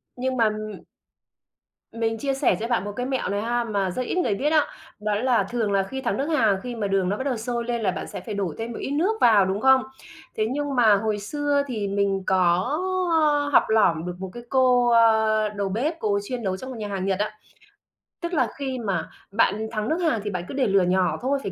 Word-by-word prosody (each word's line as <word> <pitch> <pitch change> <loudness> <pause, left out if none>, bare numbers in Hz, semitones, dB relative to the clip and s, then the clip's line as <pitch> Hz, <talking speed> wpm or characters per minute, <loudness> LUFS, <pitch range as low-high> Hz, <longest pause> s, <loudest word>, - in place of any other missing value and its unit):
Nhưng 255 +1 -2
mà, 230 - +4
ừm 215 0 -7 1.1
Mình 225 0 -1
chia 275 +3 -1
sẻ 270 0 +2
cho 230 - -3
bạn 235 -6 0
một 205 - -4
cái 250 - -2
mẹo 265 -6 -2
này 200 +1 -1
ha 240 +1 0
mà 200 -5 -1
rất 255 - -3
ít 250 - -3
người 215 - +1
biết 290 +7 0
á, 305 -2 +4 0.3
đó 210 -1 -1
là 235 -2 +2
thường 225 -4 -1
là 195 -1 +2
khi 265 +7 -6
thắng 240 - -1
nước 275 - -1
hàng 225 -11 +2
khi 245 -1 -5
mà 210 -3 -2
đường 195 -2 +1
nó 205 - -1
bắt 260 - -3
đầu 260 -4 -1
sôi 235 +1 -3
lên 240 -1 -2
là 200 - +1
bạn - - -5
sẽ - - -7
phải 215 +1 -6
đổ 190 -6 -2
thêm 225 +1 -4
một - - -6
ít 275 - -4
nước 385 +10 0
vào, 210 -5 +6
đúng 195 +3 -2
không? 265 -1 +5 0.5
Thế 215 - +1
nhưng 285 -1 -2
mà 220 -4 +5
hồi 210 0 -1
xưa 285 +6 0
thì 215 -5 -3
mình 195 -1 0
có, 185 -1 +3 0.6
ơ, 290 -1 +2
học - - +7
lỏm 175 -7 +3
được 180 0 -4
một 190 -1 -5
cái 240 0 -9
cô, 250 -2 +4
ờ, 220 -2 +4
đầu 200 -2 -3
bếp, 295 - -2
cô 200 -2 +1
chuyên 245 +1 -5
nấu 190 -1 -1
trong 260 +6 -8
một 255 - -6
nhà 210 -1 -4
hàng 195 -2 -3
Nhật 195 0 0
á. 210 - -1 0.9
Tức 340 +1 -4
là 255 -7 +2
khi 265 -2 -3
mà 195 -7 -2 0.2
bạn 215 +1 +1
thắng 215 0 -2
nước 320 - +1
hàng 310 -10 +1
thì 210 - -3
bạn 180 -3 -3
cứ - - -7
để 270 -4 +1
lửa 195 -1 +4
nhỏ 180 0 +1
thôi, 275 +2 0
phải 195 - -4
225 Hz, 250 wpm, -24 LUFS, 200-260 Hz, 1.1 s, học